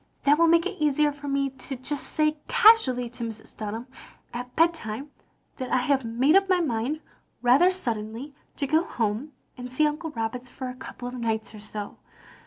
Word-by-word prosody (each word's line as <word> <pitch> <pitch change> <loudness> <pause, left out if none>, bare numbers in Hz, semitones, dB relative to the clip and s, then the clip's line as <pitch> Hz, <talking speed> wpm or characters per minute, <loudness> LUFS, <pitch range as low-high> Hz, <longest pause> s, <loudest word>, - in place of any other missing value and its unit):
"That 290 +2 +4
will 335 - +6
make 335 +1 +5
it 385 -3 -4
easier 295 0 +3
for 290 0 -9
me 275 -1 0
to 270 +1 -7
just 260 +3 -4
say 305 0 +1
casually 265 - +5
to 240 0 -7
Mrs. 220 -1 -7
Dunham, 220 +3 -5 0.5
at 250 +1 -6
bedtime, 295 -5 0 0.5
that 255 -2 -4
I - - +3
have 265 +1 +2
made 245 +8 +3
up 390 0 +5
my 370 -1 +4
mind 280 0 -1 0.4
rather 260 +9 +6
suddenly 240 - -4 0.2
to 280 - -1
go 315 +4 +3
home 230 - -2 0.3
and 250 0 -6
see 305 +4 +3
Uncle 305 +2 -1
Roberts 245 -1 -4
for 260 0 -6
a - - -5
couple 250 -1 -8
of 245 - -6
nights 225 -3 -2
or 215 - -9
so. 210 0 -7
260 Hz, 190 wpm, -26 LUFS, 235-305 Hz, 0.5 s, will